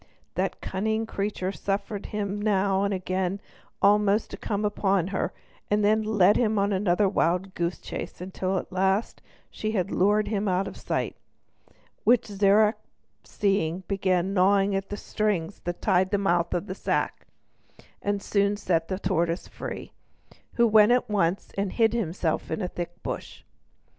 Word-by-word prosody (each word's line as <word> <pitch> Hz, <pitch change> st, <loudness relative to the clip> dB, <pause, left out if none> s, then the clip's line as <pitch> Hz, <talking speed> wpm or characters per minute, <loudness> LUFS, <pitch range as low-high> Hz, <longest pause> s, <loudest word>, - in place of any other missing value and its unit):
That -, -, -2 dB
cunning 220 Hz, +3 st, -1 dB
creature 200 Hz, -3 st, -2 dB
suffered 200 Hz, +1 st, -3 dB
him 205 Hz, -1 st, -3 dB
now 195 Hz, -2 st, +2 dB
and 200 Hz, -, 0 dB
again 185 Hz, 0 st, -1 dB, 0.4 s
almost 210 Hz, +1 st, +3 dB
to -, -, -5 dB
come 210 Hz, 0 st, -2 dB
up 205 Hz, -, -2 dB
to 195 Hz, -3 st, +3 dB
her, 190 Hz, -, -1 dB, 0.4 s
and 210 Hz, 0 st, +2 dB
then 215 Hz, +1 st, +4 dB
led 210 Hz, -2 st, +4 dB
him 220 Hz, -3 st, +1 dB
another 200 Hz, -1 st, +2 dB
wild 185 Hz, 0 st, 0 dB
goose 170 Hz, +1 st, -2 dB
chase -, -, -7 dB
till 190 Hz, 0 st, -1 dB
at 185 Hz, -, -5 dB
last 190 Hz, +3 st, 0 dB, 0.3 s
she 215 Hz, 0 st, -3 dB
had 195 Hz, -2 st, -1 dB
lured 205 Hz, +3 st, +2 dB
him 210 Hz, -1 st, -1 dB
out 185 Hz, +1 st, +1 dB
of -, -, -7 dB
sight; -, -, -2 dB, 0.9 s
which 240 Hz, 0 st, +4 dB
Zirac 210 Hz, +1 st, +3 dB, 0.5 s
seeing, 190 Hz, -3 st, 0 dB
began 190 Hz, -1 st, +1 dB
gnawing 195 Hz, +1 st, +4 dB, 0.2 s
the 205 Hz, -, -4 dB
string 205 Hz, -5 st, -1 dB
that 175 Hz, 0 st, -4 dB
tied 190 Hz, -2 st, +3 dB
the 205 Hz, -, +1 dB
mouth 175 Hz, -3 st, +1 dB
of 175 Hz, +2 st, -2 dB
the 185 Hz, -, -5 dB
sack, -, -, -2 dB, 0.7 s
and 200 Hz, 0 st, -1 dB
soon 200 Hz, 0 st, +1 dB
set 165 Hz, -5 st, 0 dB
free 190 Hz, -, -2 dB
the -, -, -7 dB
tortoise, 170 Hz, -2 st, 0 dB, 1.1 s
who 235 Hz, -, +4 dB
went 215 Hz, 0 st, +6 dB
at 245 Hz, -2 st, +2 dB
once 190 Hz, -2 st, 0 dB
and 200 Hz, -1 st, -2 dB
hid 225 Hz, -2 st, +3 dB
himself 175 Hz, -7 st, -1 dB
in 215 Hz, -, -2 dB
a -, -, 0 dB
thick 175 Hz, -1 st, -7 dB
bush. -, -, -6 dB
200 Hz, 160 wpm, -26 LUFS, 185-210 Hz, 1.1 s, went